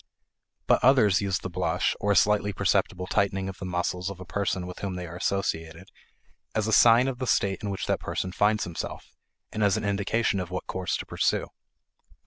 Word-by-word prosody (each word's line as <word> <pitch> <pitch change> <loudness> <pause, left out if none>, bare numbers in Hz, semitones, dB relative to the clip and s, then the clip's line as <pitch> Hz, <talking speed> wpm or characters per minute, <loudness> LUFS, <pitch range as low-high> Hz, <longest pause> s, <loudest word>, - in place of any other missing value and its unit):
But - - +3
others 115 -8 +5
use 95 -2 0
the 90 - -6
blush, 90 0 0
or 105 - +1
a - - -1
slightly 105 0 +3
perceptible 90 0 0
tightening 95 -1 0
of 95 0 -7
the 95 - -5
muscles 90 +1 -2
of 100 -2 -8
a 95 - -8
person 95 -1 -2
with 90 0 -8
whom 95 -2 -4
they 90 0 -5
are 85 0 -9
associated, 90 -2 -3 0.7
as 110 - +1
a 110 - 0
sign 120 +3 +6
of 130 -2 -3
the 130 - -3
state 95 -4 +1
in 105 - -3
which 95 - -3
that - - 0
person 95 - -3
finds 105 +3 +2
himself, 85 -2 -6 0.4
and 110 - -2
as 100 +1 +3
an 110 - -3
indication 100 +1 0
of 90 -2 -4
what 90 0 -4
course 95 -1 -2
to - - -6
pursue. - - 0
95 Hz, 205 wpm, -27 LUFS, 90-105 Hz, 0.7 s, sign